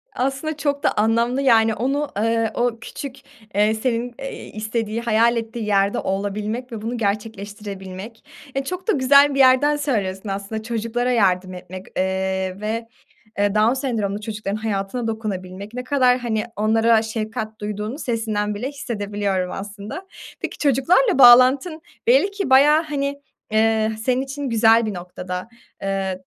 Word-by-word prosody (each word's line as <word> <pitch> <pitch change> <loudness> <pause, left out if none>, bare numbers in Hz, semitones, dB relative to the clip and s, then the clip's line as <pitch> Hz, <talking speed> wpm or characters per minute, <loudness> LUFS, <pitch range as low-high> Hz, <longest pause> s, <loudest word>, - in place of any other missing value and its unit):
Aslında 275 +4 -2
çok 285 -1 -1
da - - +3
anlamlı, 230 +4 +1
yani, 225 -4 +4
onu, 275 +6 -1
eee, 225 +1 +1
o 240 -1 0
küçük, 265 +3 -7 0.4
eee, 210 +2 +3
senin, 235 +1 -2
eee, 270 0 -6
istediği, 215 +1 -3
hayal 235 +1 +3
ettiği 225 0 -4
yerde 200 -1 +2
olabilmek 210 +5 -3
ve 225 -2 -6
bunu 235 +3 -3
gerçekleştirebilmek. 205 -1 -5 0.3
E, 270 - 0
çok 365 +7 -5
da - - +4
güzel 280 -2 +5
bir - - 0
yerden 265 +3 +5
söylüyorsun 210 -9 -2
aslında. 200 +3 -4
Çocuklara 230 +2 -1
yardım 185 -5 +2
etmek, 185 +1 -9
eee, 190 0 -1
ve, 225 +2 -3 0.5
eee, 205 0 +2
Down 215 +3 +4
sendromlu 220 -7 -2
çocukların 210 -1 -4
hayatına 215 +2 -2
dokunabilmek. 200 -2 -5
Ne 250 +1 -4
kadar, 255 -2 +3
hani, 225 -3 -1
onlara 225 +2 +3
şefkat 220 -1 -4
duyduğunu 210 +5 -4
sesinden 215 -4 -1
bile 230 +6 -3
hissedebiliyorum 205 -8 -3
aslında. 205 - -7 0.3
Peki - - -5
çocuklarla 305 - +3
bağlantın 260 +6 +7 0.3
belli 475 -5 +4
ki 400 -6 -3
bayağı, 290 +4 +6
hani, 280 -2 -3 0.3
eee, 220 0 +2
senin 255 +1 +1
için 275 +1 -4
güzel 225 0 +4
bir 215 - -3
noktada. 180 +1 -6 0.3
Eee, 195 -1 -2
225 Hz, 145 wpm, -22 LUFS, 205-255 Hz, 0.5 s, bağlantın